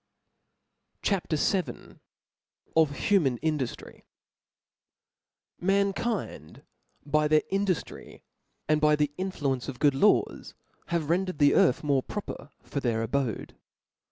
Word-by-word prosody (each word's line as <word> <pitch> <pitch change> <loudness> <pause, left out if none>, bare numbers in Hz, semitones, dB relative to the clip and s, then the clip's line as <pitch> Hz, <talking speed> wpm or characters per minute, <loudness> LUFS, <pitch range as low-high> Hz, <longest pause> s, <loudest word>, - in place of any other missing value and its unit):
CHAP. 195 -5 -1
VIL 180 +4 -1 0.8
Of 155 -3 +3
human 155 -12 +2
Indujiry. 150 -6 -3 1.6
MAnkind 195 - -1 0.4
by 150 +1 +2
their 155 0 +3
induftry, 195 -3 -3 0.4
and 155 0 +2
by 150 0 +5
the 150 -1 0
influ 185 -8 -1
ence 125 -2 -6
of 135 -3 -6
good 145 +2 +3
laws, 205 +10 +1 0.3
have 165 -2 -1
rendered 185 -1 0
the 145 -1 +5
earth 130 - +3
more 140 -3 +2
proper 145 -5 -7
for 140 - -4
their 115 -4 0
abode. 125 -2 -2
150 Hz, 110 wpm, -27 LUFS, 140-185 Hz, 1.6 s, by